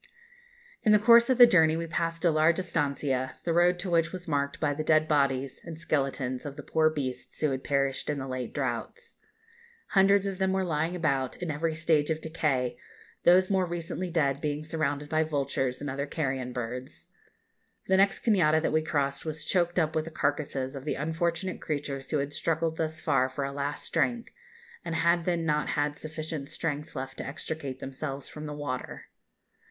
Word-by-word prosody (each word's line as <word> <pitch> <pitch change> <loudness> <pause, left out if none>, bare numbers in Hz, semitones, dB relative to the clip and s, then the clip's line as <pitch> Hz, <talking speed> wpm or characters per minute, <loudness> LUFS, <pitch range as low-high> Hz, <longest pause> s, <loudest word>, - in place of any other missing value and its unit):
In 215 - +4
the - - +8
course 235 +3 +6
of 260 - +3
the 245 - +11
journey 160 -7 +4
we 165 - -2
passed 165 +1 -2
a 170 - +5
large 155 +2 +3
estancia, 140 -7 -1
the 170 - 0
road 175 +1 +4
to 185 - -4
which 170 0 +2
was 185 -1 -7
marked 140 -2 -1
by 145 -2 +1
the 155 +2 -3
dead 155 0 +3
bodies 140 -3 +1
and 165 -2 -8
skeletons 135 -5 -1
of 145 -2 -6
the 145 - -8
poor 160 +2 +3
beasts 130 -5 -5
who 155 -2 +1
had 135 0 -3
perished 140 -1 0
in 150 - 0
the 135 -1 -4
late 130 -2 -4
droughts. 470 0 -4 0.7
Hundreds 200 0 +4
of 195 -1 -3
them 190 0 +1
were 190 0 +1
lying 165 0 -1
about 140 -6 0
in 175 -3 -3
every 160 +2 -1
stage 155 -1 +2
of 160 -1 0
decay, 150 -6 -1 0.5
those 185 +2 +6
more 190 -2 +2
recently 175 +1 -4
dead 140 -5 +1
being 150 0 -2
surrounded 150 -2 -2
by 155 +1 +1
vultures 140 -4 -1
and 145 - -4
other 140 +1 -3
carrion 135 -5 -2
birds. 125 +1 -6 0.8
The 190 - +3
next 195 +1 +2
cañada 165 -9 +4
that 160 - -1
we 155 - +3
crossed 140 -3 -1
was 155 0 -4
choked 175 -1 +1
up 160 -3 +1
with 155 0 0
the - - -6
carcases 145 -3 -2
of 135 - -6
the 150 - -2
unfortunate 170 +4 -2
creatures 140 -3 -4
who 155 - +1
had 140 +1 -2
struggled 160 +1 0
thus 160 -1 -2
far 135 -4 +2
for 130 +2 -4
a 135 - -2
last 145 +1 -4
drink, 240 -1 0 0.5
and 165 - -3
had 170 +1 +2
then 170 -2 0
not 150 -1 +1
had 145 0 +1
sufficient 155 -2 -5
strength 150 -2 -3
left 135 +1 -5
to - - -4
extricate 140 -2 -5
themselves 135 +1 -5
from 155 0 -8
the 150 - -5
water. 135 -4 -5
155 Hz, 195 wpm, -28 LUFS, 140-170 Hz, 0.8 s, the